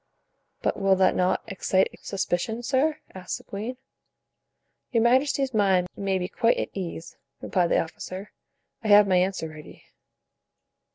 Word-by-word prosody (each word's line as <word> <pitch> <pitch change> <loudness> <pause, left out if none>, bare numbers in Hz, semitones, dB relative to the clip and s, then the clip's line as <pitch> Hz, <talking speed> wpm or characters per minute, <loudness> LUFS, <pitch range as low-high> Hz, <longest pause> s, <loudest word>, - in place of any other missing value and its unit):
"But - - 0
will 195 -1 +4
that 185 0 +3
not 180 0 +1
excite 190 -2 0
suspicion, 200 +4 -2
sir?" 280 +5 +1 0.2
asked 185 -1 -5
the - - -16
queen. 220 +6 -6 1.1
"Your 230 -3 +2
majesty's 265 +2 +2
mind 190 -4 +2
may 195 -1 -1
be 180 -1 -2
quite 230 +4 +2
at - - -2
ease," 170 -3 -6 0.2
replied 180 -2 +1
the - - +3
officer; 185 +4 -7 0.5
"I - - -3
have 205 -1 +7
my 185 -1 +3
answer 185 -2 0
ready." 155 -1 -12
195 Hz, 145 wpm, -26 LUFS, 185-230 Hz, 1.1 s, have